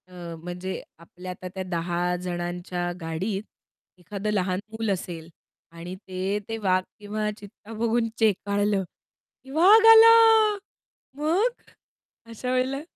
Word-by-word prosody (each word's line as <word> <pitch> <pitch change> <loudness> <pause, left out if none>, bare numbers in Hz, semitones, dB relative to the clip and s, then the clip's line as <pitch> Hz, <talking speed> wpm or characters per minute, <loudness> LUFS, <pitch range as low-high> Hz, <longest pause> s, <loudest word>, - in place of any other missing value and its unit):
अ, 175 -2 -9
म्हणजे 180 +2 -5 0.2
आपल्या 180 +2 -10
आता 185 0 -8
त्या 190 - -3
10 175 +1 -1
जणांच्या 175 0 -4
गाडीत 190 +6 -3 0.5
एखादं 200 +4 -4
लहान 185 -2 0
मूल 220 -1 -3
असेल 170 -3 -5 0.4
आणि 170 +2 -8
ते 190 +1 -3
ते 225 - -3
वाघ 185 -3 +1 0.2
किंवा 210 +1 -3
चित्ता 210 +1 -13
बघून 230 +1 0
चेकाळलं, 205 -1 +1 0.6
की 265 - -16
वाघ 375 +9 +6
आला. 450 0 +9 1.0
मग, 370 +12 0 0.7
अशा 230 +2 -5
वेळेला? 260 +2 0
195 Hz, 120 wpm, -25 LUFS, 180-225 Hz, 1.0 s, आला